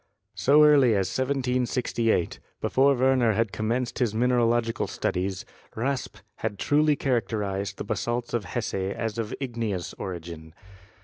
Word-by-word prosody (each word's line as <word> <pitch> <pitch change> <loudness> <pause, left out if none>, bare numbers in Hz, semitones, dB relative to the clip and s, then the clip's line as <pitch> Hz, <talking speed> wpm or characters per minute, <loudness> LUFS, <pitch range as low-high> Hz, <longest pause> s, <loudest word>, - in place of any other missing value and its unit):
So 150 +3 +5
early 140 -6 +6
as 95 -2 +1
1768, 125 -6 0 0.2
before 140 +1 +3
Werner 130 -3 +3
had 115 0 0
commenced 120 +3 -2
his 115 -4 0
mineralogical 120 -1 +1
studies, 95 0 -2 0.3
Raspe 130 +3 -3 0.2
had 110 -2 -3
truly 150 +4 +3
characterized 105 -7 -2
the - - -4
basalts 120 +3 -3
of 115 -5 -1
Hesse 110 +5 -3
as 100 +4 -2
of 110 -1 -3
igneous 115 -8 -3
origin. 85 -3 -7
115 Hz, 125 wpm, -26 LUFS, 100-130 Hz, 0.3 s, early